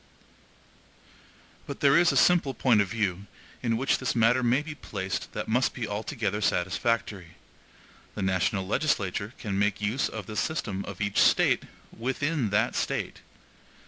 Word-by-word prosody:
But 140 - -6
there 140 -1 +5
is 175 +1 +5
a - - 0
simple 165 -7 +4
point 115 -3 +4
of 100 - 0
view 100 -2 -2 0.3
in 115 -2 0
which 135 +4 +1
this 130 - -2
matter 120 +2 +4
may 125 +4 +2
be 155 0 -6
placed 95 -9 -5
that - - -4
must 125 +4 +1
be 115 -3 -3
altogether 105 -1 -3
satisfactory. 95 -1 -1 0.8
The 100 - -3
national 95 +1 0
legislature 105 -3 -1
can 100 -3 -3
make 100 0 +1
use 105 +6 0
of 110 -4 -7
the 110 - -8
SYSTEM 105 -9 -2
OF 100 -1 -8
EACH 100 -1 0
STATE - - +3 0.3
WITHIN 130 +1 -1
THAT 105 +4 +1
STATE. - - -2
110 Hz, 150 wpm, -27 LUFS, 100-130 Hz, 0.8 s, there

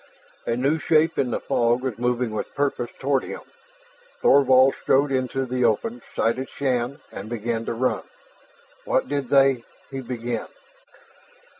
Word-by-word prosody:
A 115 - +1
new 140 +6 +1
shape 160 0 +2
in 130 - +1
the - - -1
fog 120 +1 +1
was 125 -4 -3
moving 125 -1 0
with 110 - -5
purpose 140 -4 -1
toward 135 -1 +1
him. - - -6 0.8
Thorvald 130 -1 +5
strode 140 +1 +3
into 130 0 -1
the 125 0 -1
open, 225 - +1
sighted 130 +4 0
Shann, 130 -1 -1
and 100 +3 -7
began 115 0 -2
to - - -2
run. 125 +2 0 0.8
"What - - +1
did 140 -3 -2
they 135 -3 +4
?" - - -28
he 135 0 -4
began. 120 -2 -4
130 Hz, 150 wpm, -24 LUFS, 120-135 Hz, 0.8 s, Thorvald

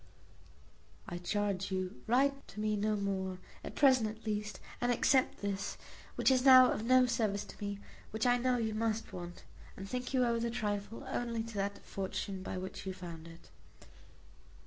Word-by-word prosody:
"I 175 -1 -5
charge 195 +1 -1
you 185 +1 -3
write 275 +4 +2
to - - -10
me 215 0 +1
no 210 +1 +1
more 190 -2 -2 0.3
at - - -7
present 260 -6 +5
at 220 +1 -10
least; 210 -1 -2 0.2
and 245 0 +2
accept 260 +2 +2
this, 200 -1 -2 0.4
which - - +3
is 255 -1 +3
now 255 -1 +9
of 215 - -2
no 255 +1 +6
service 220 -5 0
to - - -10
me, 200 0 -3 0.3
which 220 +2 -2
I 245 0 +4
know 250 0 +2
you 220 -2 -1
must 225 0 -1
want, 175 -1 -7 0.3
and 195 - -6
think 250 +2 -3
you 255 -2 +3
owe 235 -1 +1
the 235 0 0
trifle 205 -1 -3
only 230 -2 -2
to 230 0 -8
that 200 0 -3
fortune 195 0 -4
by 185 - -4
which 185 +1 -6
you 190 - -3
found 170 -3 -8
it." 165 0 -14
215 Hz, 180 wpm, -33 LUFS, 195-245 Hz, 0.4 s, now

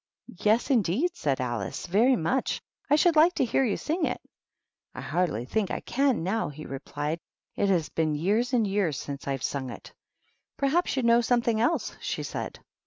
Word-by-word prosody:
"Yes, 220 +6 +2
indeed," 245 - +2
said 140 -3 -1
Alice; 120 -6 -3
"very 225 +9 +4
much. 250 +7 0 0.3
I 290 - +6
should 335 +2 +4
like 330 +4 +5
to - - +2
hear 260 +3 +2
you 220 -6 0
sing 320 +1 -1
it." - - -3 0.4
" - - -48
I 130 - -5
hardly 145 -3 -1
think 205 - -1
I - - -2
can 270 -7 +1
now," 210 +3 0
he 150 +1 -9
replied; 145 +3 -4 0.2
" - - -59
it 200 - +1
has 175 -5 +1
been 155 -2 0
years 210 +10 +1
and 240 -4 +3
years 195 -8 0
since 140 -1 -6
I've 135 -3 -2
sung 135 -2 -2
it." 120 - -10 0.3
" - - -45
Perhaps 280 +2 +1
you 260 - +1
know 235 0 +5
something 235 -2 +1
else," 320 +8 0
she - - -3
said. - - -5
205 Hz, 195 wpm, -27 LUFS, -, 0.4 s, I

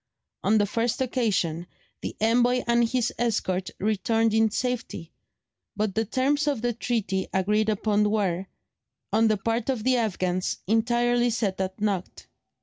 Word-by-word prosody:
On 215 +2 +3
the 205 - +3
first 230 +3 -1
occasion 205 -10 0 0.3
the - - -5
envoy 245 +3 +3
and 235 -1 +2
his 245 -1 0
escort 195 -6 0
returned 220 +2 +1
in 220 0 +4
safety, 230 -8 -3 0.6
but 210 -2 -1
the 225 +2 0
terms 280 +6 0
of 275 -6 0
the 240 0 +1
treaty 215 -5 -2
agreed 210 +3 +1
upon 210 0 +1
were, 195 -3 0 0.7
on 225 +1 +4
the 215 -1 +2
part 225 +4 -2
of 250 -5 -1
the 255 +1 +3
Afghans, 185 -5 -1
entirely 240 +3 +2
set 205 -5 -1
at 190 +1 -4
naught. 200 -4 -2
220 Hz, 145 wpm, -26 LUFS, 195-240 Hz, 0.7 s, in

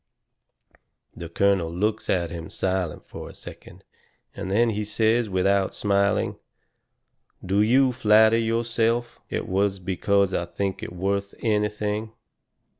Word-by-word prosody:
The 85 - -7
colonel 95 -2 +1
looks 105 +5 -2
at 85 -3 0
him 85 -1 -7
silent 95 -4 -2
fur - - -9
a - - -13
second, - - -12 0.5
and 100 -1 -5
then 115 +4 +3
he 105 0 -2
says, 110 +2 +1
without 95 +1 +1
smiling: 100 -1 +1 1.1
"Do 100 +3 +2
you 130 +4 +4
flatter 110 -1 +4
yourself 115 +1 0
it - - -3
was 95 +1 0
because 95 +1 +1
I 85 - -1
think 95 +2 -3
it - - -6
worth 100 +2 -2
anything?" 105 0 -1
100 Hz, 125 wpm, -24 LUFS, 95-110 Hz, 1.1 s, you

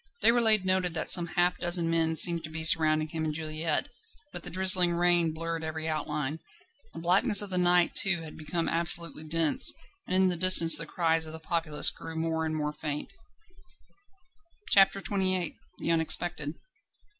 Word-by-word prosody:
Déroulède 225 -4 +2
noted 185 -2 -1
that - - 0
some 175 -2 +5
half 180 0 0
dozen 175 -1 0
men 165 -1 -1
seemed 170 0 +4
to 155 - -8
be 160 0 -6
surrounding 155 -1 +3
him 160 0 -5
and 155 -1 -4
Juliette, 155 +1 -3 0.5
but - - -6
the 175 - -5
drizzling 185 -1 +3
rain 175 -1 +1
blurred 165 +1 -6
every 160 0 -6
outline. 150 -1 -4 0.6
The - - -8
blackness 195 +5 +4
of 200 - -10
the 180 - -1
night 175 -1 +1
too 175 -4 +4
had 155 - -11
become 160 +2 -4
absolutely 165 -2 0
dense, 160 0 +1 0.4
and - - -3
in 185 - +2
the 180 - -1
distance 170 -2 +5
the - - -2
cries 165 -2 -2
of 155 - -7
the 160 - -8
populace 160 -2 +1
grew 165 - -11
more 160 0 -3
and 155 - -5
more 150 -1 -4
faint. 150 -1 -7 1.6
CHAPTER 195 0 +4
XXVIII 185 -4 -3 0.2
The - - -3
unexpected. 160 -2 +1
165 Hz, 170 wpm, -27 LUFS, 160-180 Hz, 1.6 s, some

